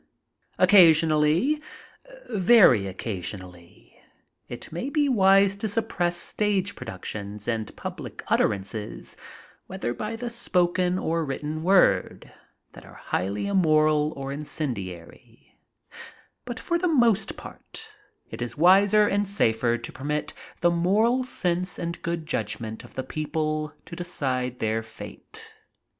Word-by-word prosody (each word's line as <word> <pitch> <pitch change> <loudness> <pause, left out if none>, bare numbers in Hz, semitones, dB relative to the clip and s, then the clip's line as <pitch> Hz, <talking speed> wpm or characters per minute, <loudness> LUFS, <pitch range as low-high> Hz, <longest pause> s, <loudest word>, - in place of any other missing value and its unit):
Occasionally 170 - +5 0.4
— - - -17
^very 185 - +5
occasionally 90 -3 -8 0.2
— - - -47
it - - -12
may 175 - -4
be 295 0 +1
wise 195 -4 +4
to 220 - -2
suppress 195 -5 -1
stage 200 +1 -1
productions 105 0 -7
and 110 -3 -3
public - - -7
utterances, 105 +1 -2 0.5
whether 120 - -3
by 215 - -4
the 240 +1 -5
spoken 180 -5 +1
or 165 -2 -1
%vritten 150 +2 -4
word, 185 +3 +2 0.4
that - - -13
are - - -15
highly 100 - -3
immoral 155 -5 +3
or 135 0 -5
incendiary, 120 - -7 0.9
but 245 0 -6
for 340 -1 -1
the 360 - +1
most 235 - +2
part - - -10 0.4
it - - -7
is 120 +3 -4
wiser 200 +5 +5
and 205 0 0
safer 120 - +1
to 120 - -8
permit 150 +3 -3 0.3
the 175 - +4
moral 210 +9 +2
sense 180 -6 -2
and 170 0 -5
good 170 -1 -3
judgment 110 -7 -3
of - - -15
the 130 - -3
people 155 +1 -2
to - - -9
decide 130 -8 -2
their 110 0 -1
fate. 110 0 -12
165 Hz, 125 wpm, -25 LUFS, 120-200 Hz, 0.9 s, Occasionally